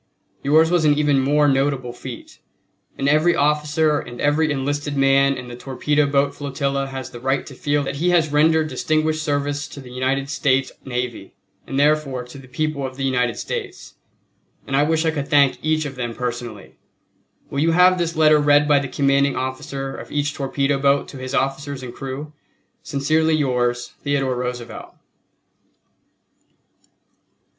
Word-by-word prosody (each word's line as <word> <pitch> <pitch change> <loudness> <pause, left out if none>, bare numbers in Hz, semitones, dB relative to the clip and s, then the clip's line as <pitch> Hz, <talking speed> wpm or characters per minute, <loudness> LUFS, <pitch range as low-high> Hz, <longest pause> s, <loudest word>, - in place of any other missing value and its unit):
Yours 160 +4 +4
was 175 -2 +3
an 145 -1 +4
even 145 -2 +3
more 145 +2 +3
notable 135 -3 0
feat, 125 -1 -10 0.6
and 135 - -1
every 155 +4 +4
officer 150 +1 +2
and 120 0 -9
every 150 +2 +2
enlisted 145 +1 -2
man 135 0 +4
in 125 -1 -8
the 120 - -8
torpedo 145 +4 0
boat 140 0 +1
flotilla 140 -1 -2
has 135 -1 -7
the 120 - -9
right 135 +2 -1
to 140 - -10
feel 145 +2 0
that 140 0 -4
he 175 +5 +1
has 165 -4 +2
rendered 155 +1 +3
distinguished 155 0 0
service 145 -1 -1
to - - -10
the 130 -2 -11
United 135 +2 -1
States 135 -1 +1
navy 125 -2 -5 0.3
and 135 - -2
therefore 145 -3 +1
to 125 +3 -12
the 130 - -14
people 150 +2 -2
of 130 0 -5
the 135 - -3
United 125 -3 0
States; 410 -6 -6 0.7
and 135 - -2
I 140 - +4
wish 160 +2 +1
I 160 - +3
could 145 -3 -4
thank 140 -2 +3
each 155 0 +1
of 140 - -5
them 120 -3 -4
personally. 120 -4 -6 0.7
Will 140 - -2
you 165 +2 +2
have 180 +1 +5
this 170 -1 -1
letter 155 -1 +5
read 145 0 +4
by 145 -1 +5
the 140 - -3
commanding 140 +1 +2
officer 135 +1 -4
of - - -10
each 145 0 -1
torpedo 140 0 -1
boat 140 0 +2
to 140 - -9
his 130 +1 -4
officers 135 0 -2
and 120 -1 -7
crew? 135 +3 -6 0.5
Sincerely 155 +3 +1
yours, 120 -4 0
THEODORE 140 -2 0
ROOSEVELT. 125 -1 -6
140 Hz, 165 wpm, -21 LUFS, 135-150 Hz, 0.7 s, have